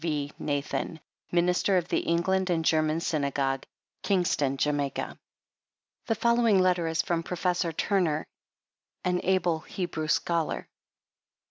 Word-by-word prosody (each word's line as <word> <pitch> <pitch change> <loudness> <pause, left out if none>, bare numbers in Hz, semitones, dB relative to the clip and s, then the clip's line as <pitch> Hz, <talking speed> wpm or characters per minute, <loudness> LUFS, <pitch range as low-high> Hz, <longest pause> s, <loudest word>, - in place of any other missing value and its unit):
V. 150 -3 -1
NATHAN, 145 +2 -2 0.3
Minister 180 +2 +3
of* 175 -1 0
the - - +2
English 185 +3 +1
and 165 -2 +1
German 155 0 +2
synagogue, 140 -4 -1 0.3
Kingston, 165 -8 +1
Jamaica. 145 -1 -1 0.9
The 225 - +2
following 235 -2 +3
letter 180 -2 +3
is 160 0 +1
from 170 -1 0
Professor 175 0 -1
Turner 165 -3 0 0.8
an 180 0 +1
able 180 -3 +2
Hebrew 165 -2 -4
scholar. 165 +1 0
170 Hz, 115 wpm, -28 LUFS, 155-180 Hz, 0.9 s, Minister